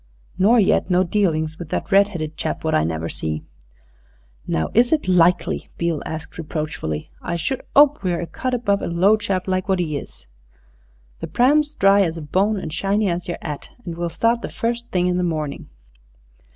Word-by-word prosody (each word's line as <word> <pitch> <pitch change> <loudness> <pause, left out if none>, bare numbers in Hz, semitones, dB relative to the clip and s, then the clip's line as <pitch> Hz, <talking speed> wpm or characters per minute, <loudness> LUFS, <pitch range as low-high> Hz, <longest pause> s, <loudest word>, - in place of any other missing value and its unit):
"Nor 225 +6 +5
yet 195 -2 +2
no 180 0 +4
dealings 160 -5 0
with 170 -3 -7
that - - -3
redheaded 190 -6 +2
chap - - -3
what 160 - 0
I 75 - +3
never 80 0 -2
see?" 80 -1 -3 1.0
"Now, 80 - 0
is 240 +2 +4
it 310 -10 +1
likely?" 180 -1 +2
Beale 170 -3 -1
asked 160 +2 -7
reproachfully. 150 - -4
"I 170 - -3
should 170 +10 -2
'ope 290 -3 +6
we're 180 -3 -1
a - - -3
cut 255 +8 -3
above 200 -4 0
a - - -2
low 180 +5 +4
chap 195 -4 -2
like 185 +1 -1
wot 190 -1 +2
'e 155 -4 -1
is. - - -13 0.9
The - - -5
pram's 295 +4 +2
dry 195 +1 +5
as 165 -3 0
a 160 - -6
bone 195 +8 +1
and 160 -5 -5
shiny 200 +3 +1
as 170 +1 -3
yer 175 - -3
'at, 150 -3 -6 0.2
and 170 -2 -5
we'll 170 0 -2
start 230 +7 +1
the - - -5
first 235 +1 -3
thing 180 -1 +1
in 180 0 +1
the 180 - 0
morning." 155 -4 -3
180 Hz, 190 wpm, -21 LUFS, 160-205 Hz, 1.0 s, ope